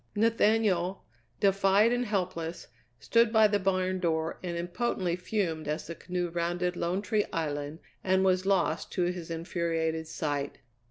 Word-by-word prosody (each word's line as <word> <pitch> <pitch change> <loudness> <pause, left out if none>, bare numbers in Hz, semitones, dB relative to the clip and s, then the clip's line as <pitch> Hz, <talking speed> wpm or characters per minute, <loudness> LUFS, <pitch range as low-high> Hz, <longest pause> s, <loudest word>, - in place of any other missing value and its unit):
Nathaniel, 210 -4 +2 0.3
defied 195 +3 +4
and 245 0 0
helpless, 180 -4 -3 0.3
stood 230 - +3
by 220 -1 +6
the 205 -1 +1
barn 185 -1 0
door 160 -2 -1
and 175 -2 -4
impotently 175 0 -1
fumed 180 -5 -2
as 150 +2 -2
the 170 - -6
canoe 180 +1 -3
rounded 175 +1 -1
Lone 180 +4 -1
Tree 210 -1 +1
Island 145 -1 -3 0.3
and 190 0 +3
was 185 0 +2
lost 195 -1 +1
to 180 - +1
his 175 -1 -3
infuriated 165 -1 -2
sight. 145 -3 -3
180 Hz, 145 wpm, -29 LUFS, 165-195 Hz, 0.3 s, by